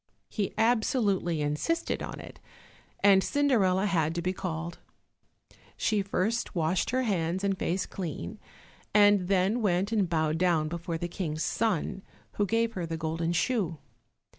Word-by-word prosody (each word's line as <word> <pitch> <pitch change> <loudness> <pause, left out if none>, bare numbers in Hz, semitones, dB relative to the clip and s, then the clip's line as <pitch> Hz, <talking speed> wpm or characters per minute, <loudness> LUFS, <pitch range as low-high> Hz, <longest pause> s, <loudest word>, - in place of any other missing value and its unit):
He 205 -3 -2
absolutely 215 - +1
insisted 150 - -1
on - - -6
it, - - -11 0.6
and 195 -1 +6
Cinderella 210 -10 +2
had 165 -5 +1
to 170 - -1
be 185 +1 0
called. 170 -2 -5 1.0
She 215 -3 +1
first 205 +4 -1
washed 170 +1 +1
her 255 +1 +1
hands 185 -4 -1
and 200 -1 +1
face 185 0 -1
clean, 155 - -6 0.6
and 205 -3 +5
then 195 +5 +2
went 195 0 +1
and 205 -6 +1
bowed 160 -1 0
down 170 -4 +2
before 170 0 -4
the 175 - -3
King's 165 -3 -3
son, 200 -3 -1 0.4
who 205 - +2
gave 230 +2 +1
her 175 -4 -3
the 165 0 -3
golden 165 +1 -2
shoe. 180 -2 0
185 Hz, 145 wpm, -29 LUFS, 165-210 Hz, 1.0 s, and